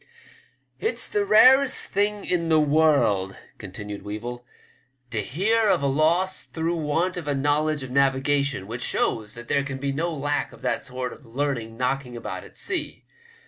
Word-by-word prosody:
'*It*s 445 - -1
the 415 -1 0
rarest 265 - +5
thing 205 +1 0
in 170 -2 0
the 160 -1 +5
world," 145 -11 +2 0.2
continued 100 +1 -7
Weevil, 115 +4 -6 0.3
'* 125 0 -41
to 110 -2 -1
hear 210 - +1
of 140 - +2
a - - +2
loss 165 +7 +1
through 165 +1 -2
want 165 +4 0
of 165 -4 -5
a 145 - 0
knowledge 145 +1 +1
of 130 - -7
navigation, 140 -2 +1
which 120 +4 -6
shows 110 -3 -1
that 120 0 -9
there 140 - +2
can 135 -1 -5
be 140 +1 -2
no 165 +5 -1
lack 145 -1 -2
of - - -16
that - - 0
sort 125 -1 -5
of - - -16
learning 120 -3 -3
knocking 125 -1 -2
about 100 -5 -6
at - - -15
sea. 375 -1 -3
140 Hz, 175 wpm, -24 LUFS, 120-165 Hz, 0.3 s, rarest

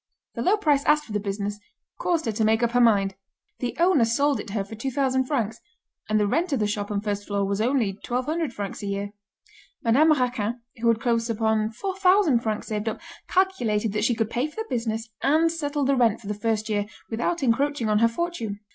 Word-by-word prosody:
The - - -4
low 400 +4 +3
price 295 -8 +2
asked 300 0 +3
for - - -12
the 210 - 0
business, 205 0 -3 0.4
caused 345 -9 0
her 225 - 0
to 220 +1 -1
make 220 +2 +3
up 235 - +2
her 245 +1 +3
mind. 200 -4 +4 0.5
The 245 - -3
owner 345 -7 +4
sold 280 +5 +2
it - - -7
her 200 0 -1
for 200 - -11
2,000 260 +2 0
francs, 230 -6 -2 0.5
and 215 0 +3
the 210 - +2
rent 325 - 0
of 275 - +1
the 210 - +1
shop 205 -1 -2
and 205 -1 -2
first 205 -1 -3
floor 200 -1 0
was 200 +1 -1
only 240 -3 +2
1,200 255 - -2
francs 205 -3 -5
a 205 - -4
year. 200 0 -3 0.7
Madame 275 +8 +5
Raquin, 245 -4 0 0.2
who 235 - 0
had 230 -1 +3
close 230 -1 0
upon 220 -1 +1
4,000 370 - +2
francs 220 -2 -3
saved 215 0 -1
up, 215 - -6 0.3
calculated 235 - +1
that 210 0 0
she 240 +1 +2
could 225 0 -1
pay 250 +5 0
for 305 - -15
the 445 - -3
business 225 -2 -2
and 315 +4 +3
settle 290 -3 -2
the 275 +1 +3
rent 230 -4 +3
for 230 - -16
the 210 - -2
first 215 +1 -1
year, 205 -2 -1 0.2
without 275 +8 -1
encroaching 270 0 +1
on 210 0 +3
her 230 - +5
fortune. 230 -6 -3
230 Hz, 220 wpm, -25 LUFS, 210-285 Hz, 0.7 s, Madame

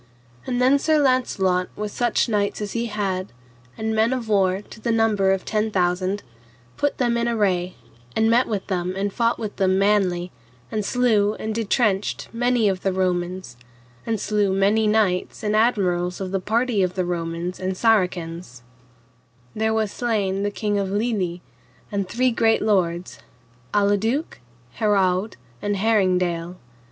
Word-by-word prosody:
And 245 -1 -1
then 260 +3 +4
Sir 310 +2 +2
Launcelot 195 -9 +1
with 210 0 -4
such 240 +1 +1
knights 205 -3 0
as 205 -2 -4
he 235 0 -2
had, 195 -3 -2 0.5
and 220 0 -2
men 220 +3 +2
of 245 -3 -3
war 195 -2 +2
to 220 - -13
the 235 - 0
number 220 -4 +2
of 195 -1 -1
ten 215 0 0
thousand, 185 +1 0 0.5
put 290 - -1
them 240 -2 +1
in 235 0 0
array, 190 -6 0 0.4
and 220 - +3
met 235 +3 +3
with 205 -3 -3
them 180 -1 -2
and 200 +1 -2
fought 235 0 +1
with 215 -3 -6
them 190 -1 +2
manly, 190 -3 +1 0.4
and 215 - -1
slew 215 -3 +2
and 220 - -4
detrenched 215 -2 0
many 245 -1 +2
of 190 -2 0
the 195 - 0
Romans, 180 -6 -2 0.5
and 225 -2 -2
slew 205 -1 +1
many 205 +3 +2
knights 210 -4 +1
and 210 0 0
admirals 180 -6 +1
of 190 -1 -4
the 195 - 0
party 225 +1 +1
of 180 -1 0
the 185 -1 0
Romans 170 +1 -3
and 185 0 -3
Saracens; 175 - 0 0.9
there 220 +1 +1
was 220 -2 0
slain 205 -5 -1
the 205 - 0
king 205 0 -1
of 195 -1 -2
Lyly 200 -5 -1 0.5
and 200 -2 -2
three 255 +1 +1
great 225 -1 +2
lords, 175 - 0 0.5
Aladuke, 210 +8 +1 0.4
Herawd, 200 -2 +1 0.3
and 205 -1 -1
Heringdale. 180 -5 +1
205 Hz, 155 wpm, -23 LUFS, 185-225 Hz, 0.9 s, then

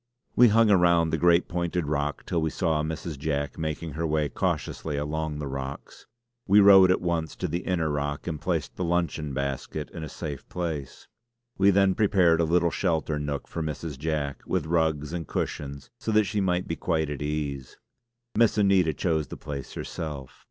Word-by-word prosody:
We 125 - +7
hung 110 0 +4
around 85 -3 +4
the 80 - 0
great 85 0 +4
pointed 85 -1 -1
rock 75 0 -2
till 85 - -1
we 80 - +1
saw 80 0 0
Mrs. 80 -1 -4
Jack 70 0 -2
making 80 +1 -3
her 80 +3 -2
way 75 -1 0
cautiously 75 -3 -2
along 75 +1 -2
the 75 - -4
rocks. 70 0 -7 0.4
We 100 +2 +6
rowed 95 -2 +8
at 90 - +2
once 85 -2 -1
to 90 - -3
the 85 +2 -2
inner 90 -3 -1
rock 75 -1 -2
and 80 -4 -4
placed - - -2
the 90 - -1
luncheon 85 -3 -1
basket 70 +2 -4
in 80 - -7
a 80 - -6
safe 70 -1 -7
place. 80 -6 -5 0.5
We 100 +1 +6
then 95 -1 +4
prepared 90 -5 +3
a - - +3
little 85 +1 +2
sheltered 80 -2 0
nook 70 -1 -3
for 85 - -5
Mrs. 75 -2 -5
Jack, 75 -2 -2
with 90 -5 0
rugs 80 -2 0
and 85 -2 -4
cushions 70 -1 -4
so 110 - -2
that 110 0 +5
she 105 0 -1
might 90 -1 0
be 80 - -2
quite 80 -4 -1
at 70 -2 -5
ease. 75 -3 -3 0.6
Miss 115 -1 +3
Anita 95 -5 +4
chose 80 -4 0
the - - -8
place 70 -2 -7
herself. 75 -5 -6
80 Hz, 185 wpm, -26 LUFS, 75-90 Hz, 0.6 s, rowed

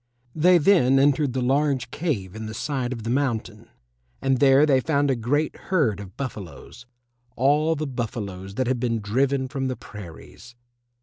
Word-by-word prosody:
They 175 +3 +5
then 155 -6 +4
entered 140 -1 +2
the 130 -1 -1
large 135 0 +1
cave 115 - -3
in 110 0 -6
the 110 - -7
side 130 -4 -2
of 115 -3 -5
the 115 - -2
mountain, 130 -4 -2 0.5
and 135 -2 +1
there 140 +1 +6
they 135 -3 +3
found 145 0 +1
a - - +1
great 140 +7 -1
herd 145 - 0
of 100 -2 -11
buffaloes 120 - -8 0.5
all 150 +5 +2
the 155 0 -3
buffaloes 105 -7 -5
that 130 - 0
had 125 0 0
been 115 -2 -1
driven 130 +6 0
from 135 -1 -3
the 130 - -2
prairies. 105 +4 -12
130 Hz, 170 wpm, -24 LUFS, 115-145 Hz, 0.5 s, there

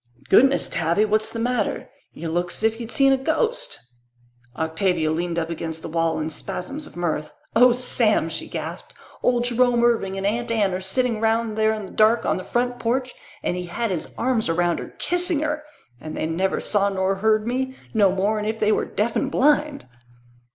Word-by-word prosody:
"Goodness, 270 +7 +5
Tavy, 170 +6 +1
what's 215 +1 +2
the - - -5
matter? 235 -2 -1 0.2
Y' 165 - -9
look 175 +2 -1
'sif 220 +4 0
y'd 230 -1 -6
seen 270 +2 +4
a - - +3
ghost." 470 - 0 0.8
Octavia 160 0 0
leaned 170 +1 -2
up 165 0 -1
against 160 -1 -5
the - - -4
wall 165 0 0
in 155 +1 -3
spasms 275 - -5
of - - -15
mirth. 155 -3 -2 0.2
"Oh, 250 +2 +7
Sam," 235 -6 +1
she 160 0 -5
gasped, 165 +2 -6 0.3
"old 245 -1 +2
Jerome 245 0 +2
Irving 210 -5 +1
and 195 - -3
Aunt 230 +4 -1
Anne 205 -4 +1
are 185 - -2
sitting 220 +4 -1
round 225 0 +1
there 220 0 +3
in 215 -2 -6
the - - -11
dark 220 +2 +3
on - - +1
the 185 - -5
front 245 +3 -1
porch 255 +2 -1 0.3
and - - 0
he 180 0 -4
had 225 +5 -2
his 175 - -4
arms 235 -5 0
around 175 +1 +1
her, - - -9
kissing 355 -3 0
her! 300 0 -1 0.4
And 155 +3 -7
they - - -1
never 175 +4 0
saw 200 -1 +1
nor 190 0 0
heard 215 +1 +2
me, 260 +2 -2 0.2
no 205 -4 +4
more'n 210 +3 0
if 220 +1 -2
they 215 0 +3
were - - +1
deaf 220 +2 -1
and 275 - 0
blind!" 295 +1 +2
215 Hz, 195 wpm, -23 LUFS, 175-245 Hz, 0.8 s, Oh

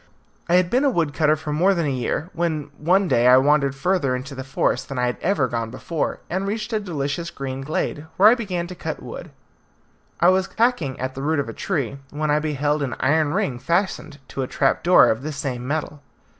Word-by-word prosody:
I 175 - +4
had 180 -1 +3
been 255 +3 +3
a 285 - +4
wood 165 - 0
cutter 155 -1 +3
for 155 -1 -5
more 185 +6 +3
than 170 -2 0
a - - 0
year, 135 +6 -2
when 160 -4 -2
one 185 +5 +3
day 120 -5 +3
I 125 0 +8
wandered 140 0 +3
further 140 -3 +1
into 130 +3 -6
the 130 -1 -6
forest 135 +1 -1
than 135 - -5
I 125 - +1
had 125 - -1
ever 170 -8 +1
done 115 -1 -3
before, 150 +6 -3
and 190 +3 -2
reached 215 +2 -3
a 215 - +2
delicious 165 -3 -3
green 135 -1 -5
glade, 150 +1 -3
where 200 - +7
I 220 - +8
began 190 -8 -2
to 180 - -8
cut 180 - -6
wood. - - -8 0.9
I - - +6
was 190 +1 +2
hacking 220 - +1
at 130 +1 -3
the 135 - -6
root 155 +3 0
of 140 - -1
a - - -6
tree, 140 - -3
when 150 0 -2
I 150 - +3
beheld 150 -1 -1
an 135 -3 -2
iron 150 +3 +2
ring 165 - -1
fastened 170 0 -1
to 135 - -4
a 130 - -2
trapdoor 170 +8 +4
of 110 - -2
the 155 +3 -4
same 130 -4 -4
metal. 150 0 -3
150 Hz, 225 wpm, -22 LUFS, 135-180 Hz, 0.9 s, I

